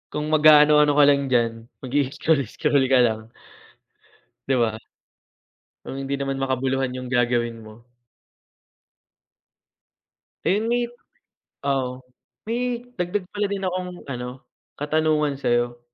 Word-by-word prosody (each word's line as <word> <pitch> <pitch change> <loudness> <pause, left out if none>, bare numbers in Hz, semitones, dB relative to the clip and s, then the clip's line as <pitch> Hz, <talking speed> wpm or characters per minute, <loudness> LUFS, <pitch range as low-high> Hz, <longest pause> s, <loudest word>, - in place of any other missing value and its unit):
kung 150 0 -2
mag-aano-ano 150 -1 +6
ka 145 - +7
lang 140 -1 +3
diyan, 120 -2 +2 0.3
mag-ii-scroll-scroll 140 0 +1
ka 130 -1 +5
lang 110 -1 -1 1.3
'Di 135 - +2
ba? 110 -1 -1 1.1
Kung - - -6
hindi 135 +1 -3
naman 135 -1 -3
makabuluhan 130 0 0
'yung 130 0 -6
gagawin 120 -2 0
mo 110 +2 -15 2.6
Ayun 215 +4 +1
may 240 0 +1 0.8
oo. 130 -2 -1 0.5
May 245 +1 -2
dagdag 180 +1 -2
pala 205 0 0
din 195 -1 -2
akong 180 -2 -5
ano, 125 -1 -7 0.3
katanungan 150 -1 +1
sa'yo. 120 -1 0
140 Hz, 105 wpm, -23 LUFS, 125-155 Hz, 2.6 s, ka